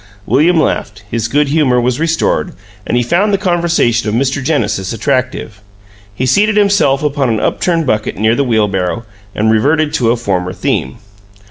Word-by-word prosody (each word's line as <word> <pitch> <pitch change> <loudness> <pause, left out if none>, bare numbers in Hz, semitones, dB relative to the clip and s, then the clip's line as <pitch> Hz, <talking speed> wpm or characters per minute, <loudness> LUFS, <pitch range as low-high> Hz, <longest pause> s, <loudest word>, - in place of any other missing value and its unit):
William 160 +8 +3
laughed; 105 -9 -2
his 115 -1 -1
good 145 +4 +1
humor 140 -5 +2
was 125 +2 0
restored 165 +2 0 0.3
and 120 - 0
he 120 - +2
found 185 - +1
the 200 - +2
conversation 170 - +1
of 105 - -1
Mr. 135 +2 0
Genesis 115 - -1
attractive. 130 -5 -2 0.5
He 130 - -2
seated 205 - +2
himself 200 -10 +2
upon 140 -3 0
an 110 -2 0
upturned 165 +7 0
bucket 110 -7 -1
near 110 +3 +2
the 140 - +1
wheelbarrow, 105 -3 -1 0.3
and 110 +1 +1
reverted 145 +7 +1
to 115 -3 +1
a 120 - +2
former 90 -5 -2
theme. 65 -7 -2
130 Hz, 165 wpm, -14 LUFS, 110-160 Hz, 0.5 s, William